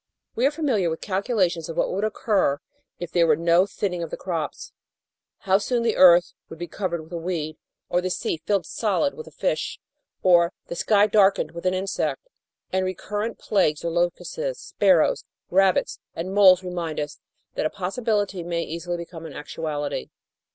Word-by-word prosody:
We 245 +4 +3
are - - +1
familiar 265 - 0
with 160 - -3
calculations 190 -5 0
of 165 - -6
what - - +1
would 195 +3 -2
occur 205 -8 +1 0.4
if 175 -1 -6
there 170 -2 +3
were 155 - +5
no 170 +4 +3
thinning 185 -3 -3
of 165 - -4
the - - -5
crops 165 -5 -4 0.7
how 190 0 +3
soon 240 +2 0
the 230 -2 +1
earth 175 -1 +7 0.2
would 165 - -9
be 175 - -4
covered 175 -3 -3
with 160 - -17
a - - -2
weed, 165 -3 -3 0.3
or 175 - +1
the 185 - -2
sea 165 -2 -2
filled 200 -5 +1
solid 225 - 0
with 465 - -9
a - - -11
fish, - - -2 0.4
or 175 -1 +5
the - - -6
sky 205 +3 +4
darkened 200 -6 +3
with 170 +2 -4
an 185 - +2
insect, 195 - -2 0.4
and 190 0 +2
recurrent 205 +4 -3
plagues 170 -6 +1
or 170 - 0
locusts, 175 - -1 0.2
sparrows, - - +3 0.3
rabbits, 190 0 +3 0.2
and 180 +4 -4
moles 190 -2 +7
remind 175 -4 -3
us 150 0 -5 0.3
that - - 0
a - - -6
possibility 205 0 -1
may 170 0 -2
easily 170 +2 -4
become 165 -1 -8
an 150 - -10
actuality. 150 - -4
180 Hz, 180 wpm, -24 LUFS, 170-205 Hz, 0.7 s, earth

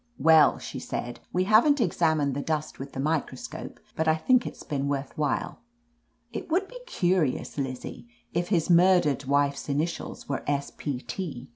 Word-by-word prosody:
"Well," 160 -1 +6
she - - -7
said;, 120 0 -5
"we 180 - +1
haven't 230 +9 +5
examined 160 - +2
the 140 - -2
dust 155 0 -3
with 135 +1 -7
the - - -6
microscope, 155 +1 -3 0.2
but 160 - 0
I 160 - +5
think 245 +10 +3
it's - - -8
been 140 -3 -2
worth 140 -1 -3
while 150 -3 -1 0.7
It 230 - -5
would 370 +4 +1
be - - -10
curious, 175 - 0
Lizzie, 130 -3 -5 0.3
if 175 +1 0
his 170 -5 +1
murdered 175 -5 +4
wife's 140 +1 +1
initials 155 +5 -3
were 140 - -3
S. 140 -1 -1
P, 135 -4 -4
T." 155 -10 -6
155 Hz, 165 wpm, -27 LUFS, 140-180 Hz, 0.7 s, Well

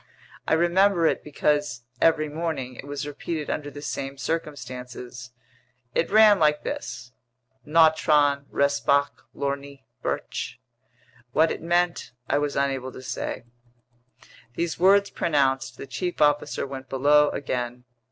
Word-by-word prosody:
I - - +2
remember 175 +1 +3
it - - +1
because, 145 -4 0 0.2
every 155 -2 +4
morning, 150 -4 -3
it 135 - -10
was 145 0 -4
repeated 150 +1 -4
under 145 -1 -3
the 145 0 -10
same 135 -2 -4
circumstances. 125 -4 -5 0.6
It 165 - +1
ran 210 -1 +6
like 150 -1 +3
this: 285 - -5 0.6
"Nautron 150 -3 +4
respoc 140 0 +1
lorni 140 0 -4 0.2
virch." - - -3 0.8
What 160 +1 +4
it - - -4
meant 175 -3 0
I 145 - +2
was 145 -1 -2
unable 135 -2 -1
to 130 - -10
say. 120 - -4 1.1
These 170 -1 -2
words 200 +2 +5
pronounced, 135 -4 0
the - - -7
chief 175 +8 -4
officer 145 0 +2
went 135 -1 -8
below 145 +3 +4
again. 125 -2 -3
145 Hz, 125 wpm, -25 LUFS, 135-165 Hz, 1.1 s, ran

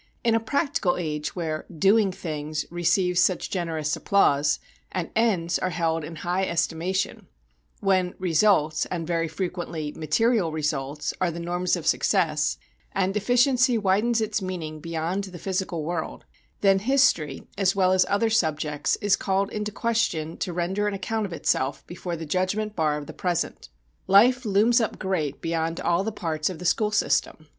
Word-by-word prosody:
In 230 -1 +3
a 225 - +3
practical 275 - 0
age 150 -3 -3
where 160 -3 -3
"doing 195 +4 +3
things" 155 -3 -4
receives 175 +1 +2
such 185 0 +1
generous 160 -4 -1
applause, 145 -8 +3 0.3
and 180 -3 -3
"ends" 195 -7 +1
are 185 - -1
held 165 -2 -1
in 165 +2 -7
high 175 +4 -1
estimation; 170 +2 -1 0.5
when 185 -3 +1
"results," 165 -3 +2
and 170 -2 -3
very 165 0 0
frequently 165 -3 -4
material 180 - +1
"results," 150 -1 -2
are 185 - +2
the 170 0 -5
norms 175 +1 0
of - - -6
success, - - +1 0.4
and 195 0 0
"efficiency" 245 +3 +3
widens 215 +3 +2
its 215 -1 -1
meaning 170 -5 -5
beyond 165 +5 -2
the 185 -2 -9
physical 185 -2 -2
world, 165 0 -4 0.4
then 195 -1 +4
history, 215 - +2
as 195 -1 +2
well 185 -1 +3
as 185 -1 +5
other 225 +3 +2
subjects 155 -7 +1
is 205 -1 +4
called 195 0 -1
into 210 0 -3
question 210 -9 -1
to 185 - -3
render 185 +4 -1
an 205 - -1
account 215 +2 -2
of - - -13
itself 135 -4 -1
before 175 0 -5
the 165 0 -6
judgment 185 +6 -1
bar 155 -2 +1
of 150 - -6
the - - -9
present. 180 -3 -2 0.4
Life 245 +6 +5
looms 220 +4 +4
up 220 - -2
great 160 -7 -2
beyond 165 0 -1
all 175 +2 +1
the 220 - -2
parts 160 -6 -2
of 185 - -6
the 180 - -8
school 210 +5 +2
system. 160 -6 0
180 Hz, 165 wpm, -25 LUFS, 160-205 Hz, 0.5 s, as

